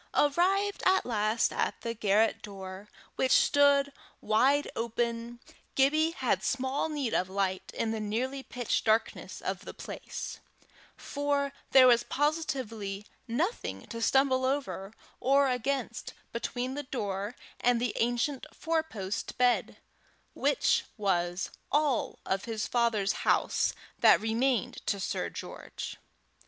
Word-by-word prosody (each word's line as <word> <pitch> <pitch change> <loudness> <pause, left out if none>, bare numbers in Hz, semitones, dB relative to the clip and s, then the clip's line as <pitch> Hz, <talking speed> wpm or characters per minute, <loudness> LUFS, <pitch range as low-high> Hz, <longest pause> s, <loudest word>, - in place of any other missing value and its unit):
Arrived 380 +7 +2
at 375 +1 +4
last 220 -1 +1
at - - -1
the 230 - -3
garret 215 0 +2
door, 195 0 -8 0.3
which 260 - +1
stood 285 -1 +4 0.3
wide 270 +7 +3
open, 235 +1 -2 0.4
Gibbie 305 +4 +4
had - - 0
small 265 +3 0
need 285 -6 -2
of 185 - +1
light 190 -1 -1
in 225 - -1
the 225 - -2
nearly 245 +6 -2
pitch 245 -3 -2
darkness 220 0 0
of - - -3
the - - -9
place, - - -6 0.6
for 285 -1 -1 0.2
there 265 -1 +8
was 240 -2 +6
positively 245 -10 -2 0.2
nothing 315 - -2
to 230 -1 -5
stumble 260 +2 +3
over 260 -7 -2 0.3
or 275 +1 +4
against 250 -1 -2 0.2
between 245 +2 -3
the 290 - -3
door 205 -5 -3 0.2
and 245 -1 +3
the 240 -1 -1
ancient 245 +5 0
four 325 0 0
post 205 -10 -5
bed, 250 -1 +2 0.6
which - - +2
was 175 -3 0 0.2
all 290 -3 +1
of 190 +1 -1
his 225 -2 -2
father's 230 -5 +1
house - - +2 0.2
that - - +7
remained 230 +1 0
to 200 - +1
Sir 185 - -2
George. - - -7
245 Hz, 125 wpm, -30 LUFS, 215-280 Hz, 0.6 s, there